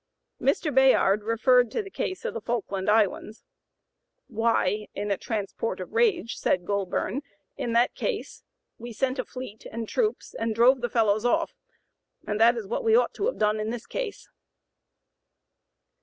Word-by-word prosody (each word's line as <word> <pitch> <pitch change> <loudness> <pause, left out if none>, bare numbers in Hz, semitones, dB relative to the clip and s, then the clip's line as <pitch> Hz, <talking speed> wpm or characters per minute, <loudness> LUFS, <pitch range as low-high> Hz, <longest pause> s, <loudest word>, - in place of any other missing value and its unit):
Mr. 290 +2 +1
Bayard 255 -6 +4
referred 245 +3 +3
to 435 - -2
the 390 - -11
case 375 - -4
of - - -2
the 225 - -5
Falkland 205 -4 -2
Islands. 215 0 +1 0.8
"'Why' 215 -3 0
(in 205 +1 -3
a - - +3
transport 220 +1 -3
of - - -7
rage), 420 - +1
said 180 -1 0
Goulburn, 200 +5 -1 0.3
'in 245 -4 -3
that 235 +1 +3
case 455 -4 -4 0.4
we 235 0 -8
sent 260 +4 -1
a - - +1
fleet 255 -4 -9
and 225 0 -5
troops 440 - -1
and 225 -1 -2
drove 250 +3 +5
the 240 - -1
fellows 215 -2 +2
off; 245 - +1 0.7
and 210 0 -2
that 235 +2 +5
is 225 - -4
what 230 - -3
we 450 -1 +4
ought 485 - +3
to 405 - -1
have - - -2
done 210 0 +1
in 215 +1 -2
this 235 0 -5
case.'" - - -5
230 Hz, 165 wpm, -26 LUFS, 210-265 Hz, 0.8 s, drove